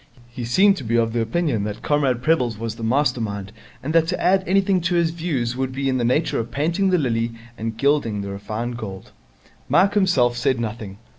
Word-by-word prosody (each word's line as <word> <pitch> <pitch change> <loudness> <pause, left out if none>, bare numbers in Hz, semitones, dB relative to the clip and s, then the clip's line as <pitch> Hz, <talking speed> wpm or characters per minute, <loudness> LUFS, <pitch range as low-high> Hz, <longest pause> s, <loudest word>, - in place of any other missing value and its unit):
He 120 0 -6
seemed 195 - +4
to - - -6
be 115 0 -1
of 115 -1 +1
the 120 - +1
opinion 115 -2 0
that 105 0 -6
Comrade 135 -5 +1
Prebble's 125 -8 +1
was 115 0 -4
the 115 - -9
master 125 +1 +1
mind 100 -2 -4 0.3
and 155 +4 -3
that 165 -1 +4
to 180 - -2
add 190 +1 +3
anything 190 0 +2
to 175 +1 0
his 170 -1 +2
views 145 -8 -2
would 130 0 -2
be 135 +1 -2
in 130 -1 +1
the - - 0
nature 130 +7 +1
of 115 0 -4
painting 170 +8 0
the 185 - +3
lily 115 -5 -1 0.2
and 115 -1 -5
gilding 140 -7 +1
the 100 0 -5
refined 110 +5 -4
gold. 95 -5 -8 0.6
Mike 180 +9 +4
himself 175 - +3
said 125 +1 0
nothing. 110 -3 -5
125 Hz, 215 wpm, -22 LUFS, 115-165 Hz, 0.6 s, seemed